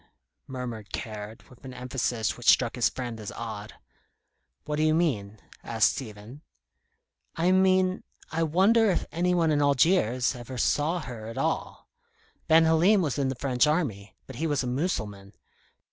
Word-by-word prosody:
murmured 120 -5 -6
Caird, 110 0 -7
with 125 +1 -20
an 130 -1 -9
emphasis 125 -2 -2
which 120 - +1
struck 115 - +4
his 125 - +2
friend 120 -3 -6
as 105 - -6
odd. 105 -3 -7 0.9
"What 150 0 -3
do - - 0
you 155 0 +3
mean?" 110 -12 -1 0.2
asked 115 -2 +2
Stephen. 110 +2 -9 0.9
"I 170 +3 +2
mean, 185 0 +3 0.3
I 160 +1 -1
wonder 195 +8 +4
if 180 - 0
any 180 +3 +1
one 165 -2 +2
in 145 -1 +2
Algiers 140 - +2
ever 125 0 -8
saw 155 +7 +1
her 115 -6 -8
at 115 - -8
all? - - -3 0.6
Ben 160 +1 +6
Halim 175 +5 +4
was 145 -4 -2
in 135 - +1
the 130 - -3
French 125 0 +1
Army; 130 - -2
but 130 - -10
he 160 - -1
was 145 -3 0
a - - -3
Mussulman. 110 - -3
130 Hz, 160 wpm, -27 LUFS, 115-165 Hz, 0.9 s, Ben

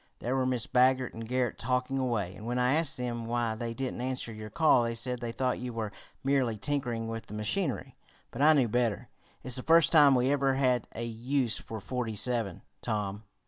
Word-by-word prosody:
There 125 +3 -2
were 130 -1 +1
Mrs. 125 -3 -1
Baggert 130 0 +3
and 115 0 -7
Garret 125 -1 -1
talking 125 +2 -1
away, 115 -8 -1
and 105 +4 -9
when 120 +1 -1
I 125 +1 +3
asked 160 -1 +1
them 120 -2 -3
why 120 -1 0
they 115 +1 -5
didn't 130 -1 -3
answer 125 -2 -3
your 110 0 -8
call 155 -5 +4
they 115 0 -1
said 125 +1 -2
they 120 -1 -4
thought 125 +1 -1
you 125 0 -5
were 110 -2 -3 0.3
merely 130 -5 +1
tinkering 120 -3 -2
with 115 0 -5
the 105 - -8
machinery. 135 - -2 0.4
But 120 - -5
I 155 +2 +7
knew 135 -5 +3
better. 120 0 0 0.3
It's 130 -2 -2
the - - -3
first 165 +3 +5
time 145 -4 +7
we 125 +2 +2
ever 135 -2 +2
had 125 -3 +1
a 115 - -3
use 120 +1 -1
for 110 - -7
'forty 120 0 -3
seven,' 115 -4 0 0.2
Tom." 105 -2 -3
125 Hz, 210 wpm, -29 LUFS, 115-130 Hz, 0.4 s, I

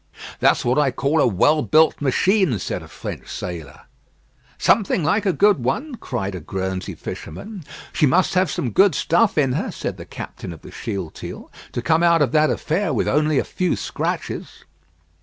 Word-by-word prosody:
"That's - - +3
what 125 +4 +2
I 145 -2 +3
call 140 +5 +1
a - - +4
well 145 - +3
built 155 0 +3
machine," 165 - +2
said 95 - -4
a - - -11
French - - -7
sailor. 85 -4 -6 0.8
"Something 195 -4 +2
like 200 +8 +1
a - - +4
good 200 - +3
one," 260 - -1
cried 120 - -4
a 90 - -5
Guernsey 95 +2 -4
fisherman. 190 - -8 0.3
"She 150 - +3
must 175 +7 +2
have 185 -1 +2
some 125 -3 -2
good 190 - +4
stuff 175 +8 +2
in 135 -4 +3
her," 140 - -1
said - - -5
the - - -9
captain 85 - -8
of 80 - -14
the - - -11
Shealtiel, 95 -7 -6 0.2
"to 120 - -2
come 160 +6 +3
out 170 -2 +5
of 140 - 0
that 155 0 +4
affair 165 +2 -1
with 125 - 0
only 150 +1 +2
a - - +3
few 180 -2 -1
scratches." - - -4
150 Hz, 180 wpm, -21 LUFS, 120-180 Hz, 0.8 s, out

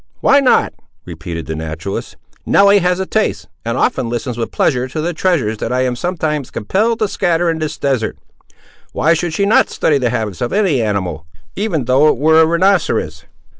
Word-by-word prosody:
why 280 - +4
not?" 270 -3 +2 0.3
repeated 85 -1 -7
the 80 - -5
naturalist; 80 +5 -5 0.3
"Nelly 200 0 +5
has 180 0 0
a 190 - -1
taste, 215 +3 -1 0.2
and - - -2
often 125 - 0
listens 120 +1 -3
with 115 0 -3
pleasure 125 0 0
to 130 - -6
the 170 +3 -2
treasures 145 - 0
that - - -3
I 130 +1 +1
am 125 -1 -1
sometimes 155 -2 -2
compelled 215 - 0
to 215 -2 0
scatter 175 -3 0
in 160 - -4
this 155 -1 -4
desert. 130 -5 -1 0.8
Why 165 - +2
should 170 +1 -2
she 200 - +1
not 205 - +3
study 145 -3 +1
the 125 -2 0
habits 110 -6 -3
of 120 - -1
any 190 - +2
animal, 95 -7 -3 0.3
even 185 - -2
though 130 +5 +4
it 150 - +2
were 160 +4 +4
a 160 - +4
rhinoceros?" 165 - 0
150 Hz, 190 wpm, -16 LUFS, 115-180 Hz, 0.8 s, Nelly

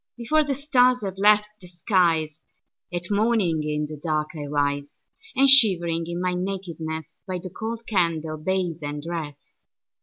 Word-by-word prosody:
Before 305 +7 +2
the 285 -2 -2
stars 255 -4 +3
have 195 -1 -5
left 210 +1 +5
the 180 - -12
skies, 170 -3 0 0.5
At 175 +2 -3
morning 205 -6 +1
in 150 0 -2
the 150 0 -8
dark 155 -2 -1
I 150 -2 -5
rise; 145 0 -2 0.3
And 270 +1 +5
shivering 175 -11 +5
in 170 0 -4
my 180 0 0
nakedness, 170 -5 -5
By 185 -1 -2
the 180 0 -8
cold 225 +3 -6
candle, 165 -6 0
bathe 180 0 -2
and 145 0 -5
dress. 160 -4 -5
175 Hz, 155 wpm, -24 LUFS, 155-210 Hz, 0.5 s, left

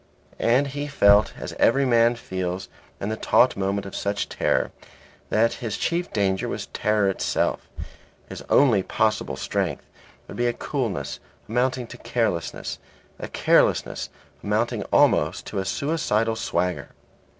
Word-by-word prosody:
And 125 +5 +3
he 145 +1 -4
felt 105 -7 +5
as - - -6
every 140 0 +4
man 120 -1 +4
feels 95 -4 -4 0.3
in 100 - -3
the 110 - -1
taut 125 +3 +3
moment 100 +1 -1
of 95 - -8
such 100 0 -2
terror - - 0 0.6
that 115 +2 +3
his 115 -4 -3
chief 175 +1 -1
danger 95 -3 0
was - - -4
terror 105 -1 +1
itself; 95 - -1 0.6
his - - -8
only 120 -9 +5
possible 110 - 0
strength 65 - -2 0.4
would - - -9
be 120 - +1
a 120 - +1
coolness 120 - -3 0.3
amounting 125 +2 0
to 120 +1 -11
carelessness, 110 -9 -2 0.4
a - - -5
carelessness - - +2 0.3
amounting - - 0
almost - - +3
to - - -4
a 95 - -2
suicidal 115 -3 0
swagger. 90 -4 -2
110 Hz, 140 wpm, -24 LUFS, 100-125 Hz, 0.6 s, felt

